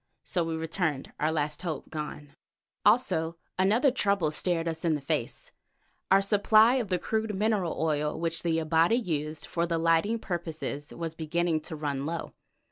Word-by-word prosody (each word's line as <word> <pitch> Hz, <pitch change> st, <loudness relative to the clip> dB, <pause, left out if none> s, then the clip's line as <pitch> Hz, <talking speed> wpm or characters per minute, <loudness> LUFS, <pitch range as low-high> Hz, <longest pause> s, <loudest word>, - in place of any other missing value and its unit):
So 175 Hz, -, 0 dB
we 165 Hz, 0 st, -2 dB
returned, 160 Hz, -3 st, -2 dB
our 155 Hz, +1 st, +1 dB
last 150 Hz, -1 st, -2 dB
hope 165 Hz, -5 st, -5 dB
gone. 150 Hz, -2 st, -6 dB, 0.5 s
Also 165 Hz, -10 st, +3 dB, 0.2 s
another 220 Hz, +8 st, +4 dB
trouble 200 Hz, -, +1 dB
stared 170 Hz, +1 st, +1 dB
us 160 Hz, -1 st, -3 dB
in 165 Hz, -2 st, +2 dB
the -, -, -3 dB
face; 140 Hz, -, -3 dB, 0.6 s
our 195 Hz, +1 st, +5 dB
supply 215 Hz, +4 st, +5 dB
of 240 Hz, -5 st, -1 dB
the 180 Hz, -1 st, +1 dB
crude 220 Hz, +2 st, -2 dB
mineral 205 Hz, -4 st, 0 dB
oil 150 Hz, -2 st, 0 dB
which 165 Hz, 0 st, -1 dB
the 165 Hz, -2 st, +1 dB
Abati 165 Hz, +5 st, +3 dB
used 155 Hz, -9 st, -2 dB
for 170 Hz, 0 st, -1 dB
lighting 165 Hz, +6 st, +2 dB
purposes 160 Hz, -7 st, -4 dB
was 165 Hz, -1 st, -5 dB
beginning 165 Hz, +1 st, 0 dB
to 160 Hz, -, -6 dB
run 145 Hz, -2 st, -3 dB
low. 170 Hz, +1 st, -4 dB
165 Hz, 160 wpm, -28 LUFS, 155-195 Hz, 0.6 s, our